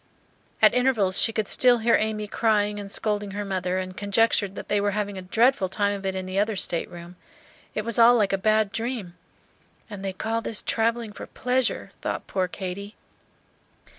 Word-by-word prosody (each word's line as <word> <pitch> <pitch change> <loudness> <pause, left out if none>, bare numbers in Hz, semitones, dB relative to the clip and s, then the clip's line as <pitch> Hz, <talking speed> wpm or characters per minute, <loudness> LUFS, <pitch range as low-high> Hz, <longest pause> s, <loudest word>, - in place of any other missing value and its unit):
At - - +7
intervals 240 -7 +2
she 225 - +3
could 215 -2 -2
still 250 -1 +5
hear 230 +1 +2
Amy 215 -1 -1
crying 210 -1 +1
and 200 -1 -7
scolding 205 -2 -2
her 205 - -3
mother, 185 -1 -2
and 185 0 -4
conjectured 205 -1 +1
that - - -7
they 205 -1 +1
were 205 0 0
having 205 -1 -2
a 190 - -6
dreadful 220 +2 +2
time 200 +1 0
of 195 -1 -4
it 190 - -2
in 190 0 -3
the 185 +1 -2
other 210 +1 +1
stateroom. 175 -1 -4 0.6
It 215 - -2
was 230 0 0
all 235 +1 +8
like 205 -4 +2
a - - +3
bad 215 0 +2
dream. 225 -6 -4 0.8
"And 200 -2 -7
they 195 - -2
call 225 +4 -2
this 225 -2 -3
travelling 230 -1 0
for - - -9
pleasure!" 250 -1 -1
thought - - -3
poor 185 -1 -1
Katy. 195 +3 -6
205 Hz, 190 wpm, -25 LUFS, 190-225 Hz, 0.8 s, all